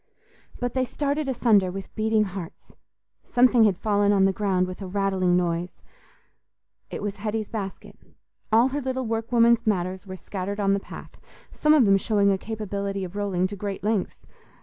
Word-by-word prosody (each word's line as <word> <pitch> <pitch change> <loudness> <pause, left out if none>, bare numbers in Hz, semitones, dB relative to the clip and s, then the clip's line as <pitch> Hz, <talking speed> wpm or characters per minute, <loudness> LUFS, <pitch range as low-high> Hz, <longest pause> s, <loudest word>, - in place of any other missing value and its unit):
But 245 -1 -2
they 260 - +1
started 285 +2 -2
asunder 220 -7 +3
with 195 +1 -8
beating 220 0 +2
hearts: 190 -4 -8 0.5
something 245 -2 +4
had 195 -4 +2
fallen 205 -1 +2
on 195 -1 +4
the 195 - +2
ground 190 -2 +1
with 185 +2 -8
a 195 - -5
rattling 190 -2 +1
noise; 175 0 -2 1.1
it - - -6
was 205 -1 -3
Hetty's 215 0 -3
basket; 200 -4 -6 0.5
all 230 +4 +5
her 285 +2 -3
little 260 -1 -2
workwoman's 230 +1 +2
matters 185 -1 -1
were 185 - -6
scattered 195 +2 -5
on 195 -1 +2
the 200 - +1
path, - - -11 0.3
some 300 0 +3
of 275 -6 +5
them 195 -1 +5
showing 200 0 +2
a 190 - 0
capability 200 -2 -4
of 185 +1 -7
rolling 195 -3 0
to 195 +2 -4
great 200 0 -5
lengths. 210 -2 -2
205 Hz, 170 wpm, -25 LUFS, 190-225 Hz, 1.1 s, all